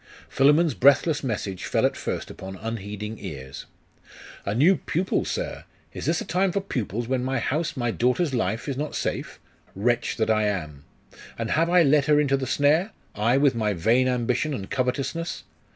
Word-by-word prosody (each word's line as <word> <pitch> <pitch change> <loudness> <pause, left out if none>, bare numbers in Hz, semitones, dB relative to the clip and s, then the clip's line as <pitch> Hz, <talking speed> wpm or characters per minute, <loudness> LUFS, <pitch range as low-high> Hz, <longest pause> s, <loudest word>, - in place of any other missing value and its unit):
Philammon's 150 +3 +4
breathless 140 +4 +4
message 105 -6 -3
fell - - +1
at - - +1
first - - -4
upon 95 0 -8
unheeding 105 0 -5
ears. 65 -2 -8 0.8
'A 100 - 0
new 160 +11 +5
pupil, 180 +4 -1
sir! - - -4 0.3
Is - - -5
this 165 +1 +2
a - - -5
time 185 +1 +1
for 200 - 0
pupils; 120 - -3
when 130 -1 0
my 135 +1 -1
house, 155 +2 -1
my 120 -2 0
daughter's 125 +7 +1
life, 115 0 -1
is 140 - -2
not 150 +2 -3
safe? - - -3 0.4
Wretch 120 +5 0
that 110 0 +1
I 110 -1 +2
am! 75 -8 -4 0.5
And 115 -1 -3
have 165 +2 +2
I 175 -1 +5
led 145 -1 +4
her 150 0 +4
into 140 -2 +2
the 135 -1 -3
snare? 155 - +2 0.2
I, 115 +5 +2
with 140 -1 +4
my 110 -3 0
vain 115 +9 +2
ambition 125 +4 0
and 95 -5 -7
covetousness! 140 +6 -2
130 Hz, 180 wpm, -25 LUFS, 110-150 Hz, 0.8 s, new